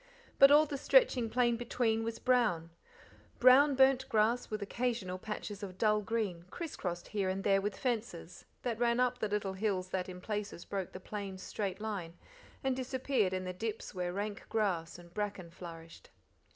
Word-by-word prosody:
But 275 Hz, -, +10 dB
all 295 Hz, +2 st, +7 dB
the 280 Hz, -2 st, -5 dB
stretching 260 Hz, -, +4 dB
plain 240 Hz, 0 st, +2 dB
between 230 Hz, -2 st, 0 dB
was 230 Hz, 0 st, -3 dB
brown. 215 Hz, -11 st, +2 dB, 0.7 s
Brown 270 Hz, +3 st, +7 dB
burnt 265 Hz, 0 st, +4 dB
grass 225 Hz, +3 st, +2 dB
with 215 Hz, -1 st, -3 dB
occasional 200 Hz, -4 st, -2 dB
patches 210 Hz, 0 st, -6 dB
of 185 Hz, -2 st, -7 dB
dull 215 Hz, 0 st, +3 dB
green, 205 Hz, -6 st, -2 dB
criss 335 Hz, -, -6 dB
crossed 175 Hz, -2 st, -4 dB
here 200 Hz, -2 st, 0 dB
and 190 Hz, +1 st, -2 dB
there 195 Hz, -1 st, +3 dB
with 205 Hz, +1 st, -3 dB
fences; 220 Hz, -9 st, -3 dB, 0.2 s
that 235 Hz, -3 st, -2 dB
ran 240 Hz, 0 st, +2 dB
up 250 Hz, 0 st, +2 dB
the 215 Hz, -, 0 dB
little 205 Hz, -2 st, -1 dB
hills 190 Hz, -2 st, -1 dB
that 185 Hz, 0 st, -2 dB
in 180 Hz, 0 st, -8 dB
places 205 Hz, -3 st, -4 dB
broke 195 Hz, -3 st, -4 dB
the 185 Hz, -, -7 dB
plain's 195 Hz, -1 st, -6 dB
straight 195 Hz, -2 st, -3 dB
line, 195 Hz, -6 st, -4 dB, 0.5 s
and 265 Hz, -1 st, +1 dB
disappeared 260 Hz, -5 st, 0 dB
in 185 Hz, 0 st, -2 dB
the 185 Hz, 0 st, -4 dB
dips 220 Hz, +3 st, -4 dB
where 180 Hz, -2 st, -2 dB
rank 205 Hz, +2 st, -4 dB
grass 185 Hz, -7 st, -1 dB
and 175 Hz, -1 st, -15 dB
bracken 205 Hz, -5 st, -4 dB
flourished. 165 Hz, -2 st, -11 dB
210 Hz, 180 wpm, -33 LUFS, 185-240 Hz, 0.7 s, But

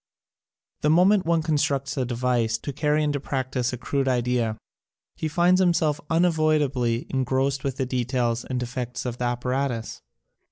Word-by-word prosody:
The 150 Hz, -, +2 dB
moment 185 Hz, +3 st, +4 dB
one 165 Hz, -1 st, +2 dB
constructs 140 Hz, -3 st, 0 dB
a 130 Hz, -, 0 dB
device 120 Hz, -2 st, 0 dB
to 140 Hz, +4 st, -6 dB
carry 150 Hz, +2 st, +1 dB
into 145 Hz, -1 st, 0 dB
practise 130 Hz, -2 st, -2 dB
a 125 Hz, -, -4 dB
crude 135 Hz, +2 st, -1 dB
idea 120 Hz, -3 st, 0 dB, 0.6 s
he 160 Hz, -, -3 dB
finds 175 Hz, +4 st, +3 dB
himself 165 Hz, -4 st, +2 dB
unavoidably 155 Hz, -7 st, +1 dB
engrost 135 Hz, +1 st, 0 dB
with 135 Hz, -1 st, -2 dB
the 130 Hz, -, 0 dB
de 125 Hz, -1 st, -1 dB
tails 120 Hz, -2 st, -1 dB
and 130 Hz, -1 st, -3 dB
defects 125 Hz, 0 st, -4 dB
of 125 Hz, -1 st, -4 dB
the 125 Hz, -, -1 dB
apparatus. 120 Hz, 0 st, -2 dB
130 Hz, 155 wpm, -25 LUFS, 125-150 Hz, 0.6 s, moment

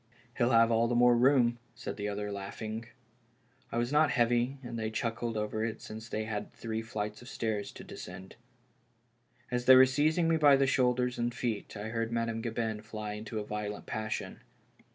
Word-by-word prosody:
" 120 Hz, 0 st, -30 dB
He'll 120 Hz, -1 st, +4 dB
have 115 Hz, -1 st, +5 dB
all 115 Hz, +1 st, +3 dB
the 120 Hz, -, 0 dB
more 120 Hz, 0 st, +6 dB
room," 120 Hz, -1 st, +4 dB, 0.2 s
said -, -, -5 dB
the 105 Hz, 0 st, -3 dB
other, 105 Hz, 0 st, -3 dB
laugh 100 Hz, -1 st, -6 dB
ing. 110 Hz, +1 st, -5 dB, 0.8 s
I -, -, -2 dB
was 120 Hz, +2 st, 0 dB
not 150 Hz, 0 st, +4 dB
heavy, 120 Hz, +2 st, +2 dB
and 120 Hz, -1 st, -5 dB
they 110 Hz, 0 st, -1 dB
chuckled 115 Hz, +1 st, -2 dB
over 105 Hz, +1 st, -2 dB
it 115 Hz, -1 st, -3 dB
since 110 Hz, +1 st, -9 dB
they 110 Hz, -, -2 dB
had 105 Hz, -1 st, -4 dB
three 110 Hz, -1 st, -4 dB
flights 105 Hz, -1 st, -4 dB
of 120 Hz, -, -11 dB
stairs 110 Hz, -3 st, -2 dB
to -, -, -10 dB
descend. 90 Hz, +1 st, -9 dB, 1.2 s
As 125 Hz, 0 st, -1 dB
they 130 Hz, -, +9 dB
were 130 Hz, 0 st, +9 dB
seizing 155 Hz, +5 st, +2 dB
me 165 Hz, 0 st, +3 dB
by 145 Hz, -3 st, +7 dB
the 135 Hz, 0 st, +3 dB
shoulders 125 Hz, -2 st, +1 dB
and 120 Hz, 0 st, 0 dB
feet, 115 Hz, -4 st, -3 dB
I 105 Hz, +2 st, -5 dB
heard 115 Hz, 0 st, -2 dB
Madame 115 Hz, -1 st, -1 dB
Gabin 110 Hz, -2 st, -2 dB
fly 105 Hz, -1 st, -6 dB
into 110 Hz, +1 st, -6 dB
a 105 Hz, -, -3 dB
violent 105 Hz, 0 st, -4 dB
passion. 110 Hz, 0 st, -4 dB
115 Hz, 195 wpm, -31 LUFS, 110-120 Hz, 1.2 s, they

